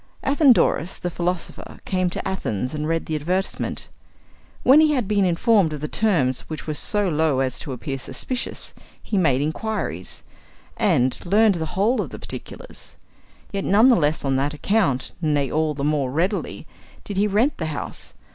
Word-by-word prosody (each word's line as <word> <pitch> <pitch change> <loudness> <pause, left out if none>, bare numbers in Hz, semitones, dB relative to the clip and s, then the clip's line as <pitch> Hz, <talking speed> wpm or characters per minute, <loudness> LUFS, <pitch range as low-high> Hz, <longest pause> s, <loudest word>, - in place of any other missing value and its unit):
Athenodorus, 250 - +3
the 175 - -4
philosopher, 175 +1 -4
came 185 -2 0
to 175 - -4
Athens 125 - -2
and 150 0 -3
read 165 0 -1
the 160 - -4
advertisement. 180 +6 -2 0.8
When 270 +4 +7
he 310 -1 +4
had 250 -8 0
been 200 -2 +2
informed 180 -1 +3
of 150 - -5
the 150 - -2
terms, 145 - +1
which 155 -4 -6
were 155 - -2
so 205 +6 +1
low 155 -4 +1
as 130 -1 -1
to 145 - -6
appear 135 +2 -4
suspicious, 240 - -3 0.3
he 215 - -3
made 145 -8 +3
inquiries, 155 - -4 0.5
and 125 0 +1
learned 210 +4 +4
the 160 - -2
whole 220 +6 +2
of - - -5
the - - -8
particulars. - - -9 0.6
Yet 195 -1 -2
none 215 +6 +5
the 250 - +6
less 150 -4 +1
on 135 -1 +1
that 145 +2 -1
account, 150 - 0
nay, 145 -4 +1
all 155 -1 0
the 140 - -4
more 145 -3 +1
readily, 180 +9 -2 0.4
did 200 - -6
he 205 +2 +3
rent 220 +8 +1
the 160 - -2
house. 155 - -6
165 Hz, 175 wpm, -23 LUFS, 145-205 Hz, 0.8 s, When